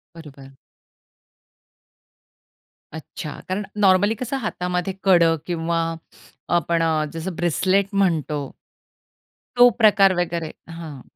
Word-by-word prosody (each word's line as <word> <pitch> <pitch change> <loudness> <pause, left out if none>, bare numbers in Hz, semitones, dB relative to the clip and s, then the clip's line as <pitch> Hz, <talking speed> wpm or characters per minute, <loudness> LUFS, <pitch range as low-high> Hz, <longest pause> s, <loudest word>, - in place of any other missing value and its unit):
बरोबर. 140 -4 -13 2.4
अच्छा, 160 +1 -8 0.2
कारण 190 +3 -2 0.2
नॉर्मली 200 +2 +4
कसं 255 +4 -4
हातामध्ये 180 -5 -3
कडं 170 -4 +4
किंवा 170 -1 -2 0.8
आपण 170 0 +1
अ, 160 -2 +1
जसं 165 +2 -5
ब्रेसलेट 185 +4 +1
म्हणतो. 155 -7 0 1.0
तो 245 0 +7
प्रकार 200 -3 +5
वगैरे 170 -2 -2 0.2
हां. 165 -5 -9
175 Hz, 90 wpm, -22 LUFS, 160-195 Hz, 2.4 s, तो